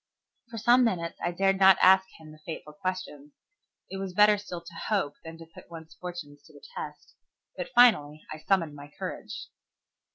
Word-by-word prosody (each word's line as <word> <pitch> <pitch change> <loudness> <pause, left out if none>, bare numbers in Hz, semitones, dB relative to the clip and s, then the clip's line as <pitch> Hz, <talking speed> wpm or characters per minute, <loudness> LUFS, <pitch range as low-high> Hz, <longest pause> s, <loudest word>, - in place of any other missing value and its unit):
For 225 - -8
some 240 +3 +4
minutes 170 -8 -2
I 175 - 0
dared 195 +2 +1
not 190 -1 +7
ask 190 +1 +6
him 155 -1 -14
the 155 - -15
fateful 150 -2 -8
questions. 150 -4 -6 0.6
It 195 - -5
was 190 -2 -6
better 210 +1 +6
still 180 -4 -7
to 170 0 -13
hope 165 -4 -2
than 165 0 -9
to 165 - -12
put 165 +1 -16
one's 160 -1 -11
fortunes 175 -5 -9
to - - -19
the - - -17
test. - - -8 0.4
But - - -5
I - - -21
finally 155 -12 +4 0.2
summoned 180 -6 +1
my 145 0 -12
courage. - - -7
175 Hz, 185 wpm, -27 LUFS, 155-195 Hz, 0.6 s, not